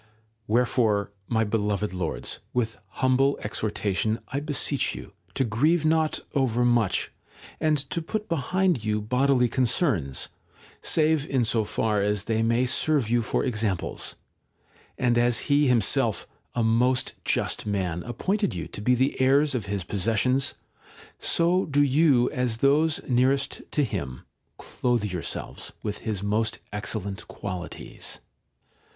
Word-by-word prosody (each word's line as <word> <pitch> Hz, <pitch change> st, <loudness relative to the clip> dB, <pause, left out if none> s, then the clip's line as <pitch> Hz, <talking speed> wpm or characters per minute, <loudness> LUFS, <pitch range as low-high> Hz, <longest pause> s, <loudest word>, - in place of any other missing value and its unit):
Wherefore, 110 Hz, -3 st, +2 dB, 0.2 s
my 110 Hz, -1 st, +1 dB
beloved 105 Hz, -2 st, -1 dB
Lords, 90 Hz, -3 st, -2 dB, 0.2 s
with 115 Hz, -3 st, -1 dB
humble 135 Hz, +2 st, +2 dB
exhortation 105 Hz, 0 st, -1 dB
I 135 Hz, -, -1 dB
beseech 145 Hz, -1 st, -1 dB
you -, -, -9 dB, 0.2 s
to -, -, +2 dB
grieve 150 Hz, +9 st, +2 dB
not 160 Hz, 0 st, +2 dB
overmuch, 120 Hz, -5 st, +2 dB, 0.5 s
and 155 Hz, -1 st, +2 dB
to 170 Hz, -, -1 dB
put 215 Hz, +6 st, -4 dB
behind 170 Hz, -, +1 dB
you 105 Hz, 0 st, 0 dB
bodily 125 Hz, +3 st, +2 dB
concerns, 120 Hz, -, 0 dB, 0.5 s
save 155 Hz, -2 st, +2 dB
in 130 Hz, -4 st, +2 dB
so 110 Hz, 0 st, +2 dB
far 105 Hz, 0 st, 0 dB
as 105 Hz, -1 st, +1 dB
they 110 Hz, -1 st, 0 dB
may 115 Hz, +2 st, +2 dB
serve 130 Hz, -2 st, +1 dB
you 120 Hz, 0 st, +3 dB
for 110 Hz, -, -1 dB
examples; 110 Hz, -7 st, -2 dB, 0.8 s
and 120 Hz, -2 st, +2 dB
as 120 Hz, +4 st, +1 dB
he 145 Hz, 0 st, +4 dB
himself, 115 Hz, -6 st, +2 dB, 0.3 s
a 120 Hz, -, +1 dB
most 120 Hz, +3 st, +2 dB
just -, -, 0 dB
man, 90 Hz, -4 st, -1 dB
appointed 190 Hz, -, -1 dB
you 85 Hz, -, -4 dB
to -, -, -7 dB
be 125 Hz, +4 st, +3 dB
the 130 Hz, +2 st, 0 dB
heirs 140 Hz, +3 st, +4 dB
of 115 Hz, -5 st, -3 dB
his 100 Hz, -2 st, -2 dB
possessions, 115 Hz, +8 st, +1 dB, 0.6 s
so 175 Hz, +3 st, +2 dB
do 145 Hz, -1 st, +3 dB
you, 140 Hz, -3 st, +4 dB
as 125 Hz, -3 st, -1 dB
those 145 Hz, +5 st, +2 dB
nearest 135 Hz, +2 st, +1 dB
to 150 Hz, -, +1 dB
him, 65 Hz, -, -4 dB, 0.4 s
clothe 120 Hz, -3 st, -1 dB
yourselves 90 Hz, -5 st, -4 dB
with 105 Hz, -1 st, -3 dB
his 105 Hz, -3 st, -3 dB
most 110 Hz, +2 st, 0 dB, 0.2 s
excellent 100 Hz, -1 st, -4 dB
qualities. 90 Hz, -3 st, -5 dB
120 Hz, 135 wpm, -26 LUFS, 105-140 Hz, 0.8 s, he